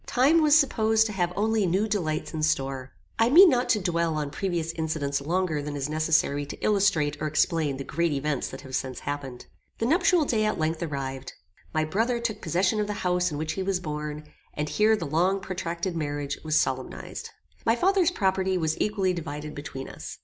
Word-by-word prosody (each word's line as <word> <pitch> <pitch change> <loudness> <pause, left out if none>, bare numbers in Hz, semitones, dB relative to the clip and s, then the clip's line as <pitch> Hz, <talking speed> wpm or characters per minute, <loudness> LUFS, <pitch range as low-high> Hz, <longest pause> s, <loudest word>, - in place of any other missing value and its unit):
Time 285 +7 +4
was 305 0 +6
supposed 220 -6 +3
to 220 - -2
have 180 -3 0
only 215 -1 +1
new 190 +5 +1
delights 170 -9 -2
in 155 - -3
store. 135 -3 -1 0.3
I 225 +1 +4
mean 355 +7 +9
not 250 -1 +1
to 215 - +3
dwell 170 -3 0
on 150 -2 -2
previous 170 0 -2
incidents 155 -4 -2
longer 165 0 0
than 145 0 -5
is 140 0 -3
necessary 155 -2 +1
to 140 - -7
illustrate 195 -8 +2
or 155 - 0
explain 150 -2 +1
the 135 - -5
great 170 +4 0
events 145 0 -1
that 135 - -8
have 130 -2 -6
since 130 -1 -3
happened. 140 -4 -5 0.3
The 225 - -1
nuptial 350 +3 +3
day 220 -5 +1
at 215 - 0
length 160 0 -1
arrived. 135 -4 -4 0.4
My 155 -1 0
brother 225 +9 0
took 235 -2 -3
possession 185 +5 +1
of 210 - 0
the 210 - -2
house 180 0 +2
in 145 - -4
which 155 +1 -2
he 190 - -3
was 190 -1 0
born, 150 -2 -5 0.3
and 150 0 -2
here 215 +1 +3
the 175 - -4
long 175 +6 +1
protracted 175 -1 -4
marriage 145 -2 -3
was 155 0 +2
solemnized. 130 -1 -3 0.3
My 225 - +3
father's 370 +5 +3
property 190 - 0
was 160 -2 -1
equally 195 -3 +1
divided 150 -3 -6
between 140 -2 -7
us. - - -8
170 Hz, 200 wpm, -26 LUFS, 150-210 Hz, 0.4 s, mean